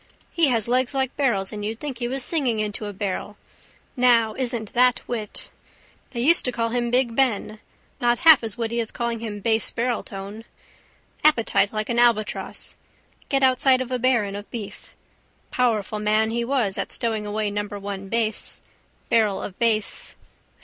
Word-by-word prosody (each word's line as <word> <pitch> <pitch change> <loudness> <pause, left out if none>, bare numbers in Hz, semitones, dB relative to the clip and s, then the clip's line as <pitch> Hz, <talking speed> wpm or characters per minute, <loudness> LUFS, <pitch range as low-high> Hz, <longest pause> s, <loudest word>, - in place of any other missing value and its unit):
He 335 -3 +3
has 230 -4 +1
legs 255 +2 +1
like 265 -1 -1
barrels 220 -9 0
and 210 -1 -6
you'd 220 +2 -4
think 275 -5 -5
he 240 - -1
was 265 +1 0
singing 260 -9 +1
into 210 0 -2
a - - -4
barrel. 205 +1 -4 0.6
Now, 235 -3 +4
isn't 235 -3 -2
that 250 0 +4
wit. 225 -3 -5 0.6
They 240 -3 -4
used 330 +7 +5
to 250 - +1
call 230 -1 -1
him 240 0 -1
big 245 -1 +1
Ben. 220 -4 0 0.4
Not 240 0 +2
half 315 -6 +8
as 225 0 -4
witty 235 0 -2
as 225 -2 -2
calling 235 -1 -3
him 210 -2 -6
base 225 +1 +2
barreltone. 220 -3 -4 0.8
Appetite 230 -8 +3
like 215 -1 -3
an 235 0 +1
albatross. 230 -3 0 0.5
Get 275 -1 +1
outside 260 0 +4
of 255 -1 -4
a 250 - -1
baron 230 -5 +1
of 205 +1 -8
beef. 205 -3 -8 0.6
Powerful 220 -4 0
man 215 +1 +2
he 235 +1 -1
was 235 -6 0
at - - -3
stowing 220 -3 -2
away 210 0 -1
number 205 0 -4
one 195 -1 -6
Bass. 225 -1 -2 0.4
Barrel 215 -4 +2
of 190 - -7
Bass. 220 -3 +1
230 Hz, 170 wpm, -23 LUFS, 210-250 Hz, 0.8 s, half